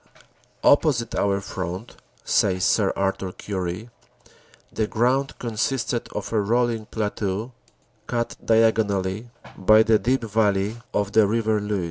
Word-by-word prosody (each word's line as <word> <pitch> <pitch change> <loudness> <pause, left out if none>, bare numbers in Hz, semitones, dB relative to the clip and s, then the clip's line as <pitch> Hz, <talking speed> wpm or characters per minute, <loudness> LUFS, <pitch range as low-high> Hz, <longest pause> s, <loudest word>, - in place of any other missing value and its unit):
"Opposite 135 -6 +3
our 100 -1 +1
front," 95 +3 -6 0.3
says 95 -1 +2
Sir 100 -3 +3
Arthur 95 -1 -1
Currie, 95 +4 -5 0.8
"the 110 - 0
ground 130 +5 0
consisted 120 +1 -2
of - - -5
a 110 - +3
rolling 115 0 0
plateau 105 +1 -3 0.6
cut 120 -1 -2
diagonally 110 -2 +1 0.3
by 110 +3 +5
the 110 -1 +3
deep 125 +5 0
valley 105 -1 +1
of 100 -1 -1
the 110 -1 +5
River 110 0 +1
Luce. 105 -1 -1
110 Hz, 120 wpm, -23 LUFS, 100-115 Hz, 0.8 s, by